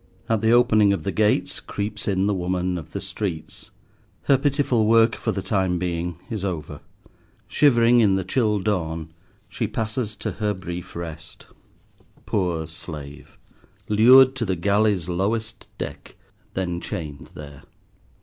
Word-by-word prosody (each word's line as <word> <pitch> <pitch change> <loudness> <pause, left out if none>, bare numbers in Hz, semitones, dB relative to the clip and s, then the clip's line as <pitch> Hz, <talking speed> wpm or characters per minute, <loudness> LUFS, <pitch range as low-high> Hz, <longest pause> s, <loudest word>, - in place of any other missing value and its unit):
At 110 -2 +1
the 110 - +2
opening 115 -4 +5
of 100 - -3
the 100 - -1
gates, 105 +1 +1
creeps 105 +1 -5
in 95 -1 +1
the 105 - +1
woman 90 0 -1
of 80 -2 -7
the 100 - -4
streets. 95 -4 -6 0.5
Her 140 - +4
pitiful 135 -5 +1
work 115 0 +5
for 110 - -2
the 95 -2 -4
time 95 -3 0
being 85 -1 -3
is 110 -4 -4
over. 85 -6 -4 0.7
Shivering 120 -4 +4
in 100 -4 +4
the 95 - -1
chill 105 +2 +1
dawn, 85 -6 -2 0.3
she 105 - -3
passes 110 -1 -3
to - - -4
her 105 -1 +1
brief 90 -1 -7
rest. 85 -1 -8 0.8
Poor 85 -5 -1
Slave! 75 -4 -9 0.5
Lured 130 +5 +7
to 120 - -1
the 95 -4 0
galley's 100 0 +1
lowest 110 +5 -2
deck, - - -7 0.4
then 90 -2 -2
chained 75 -4 -6
there. 70 -2 -10
100 Hz, 145 wpm, -23 LUFS, 85-110 Hz, 0.8 s, Lured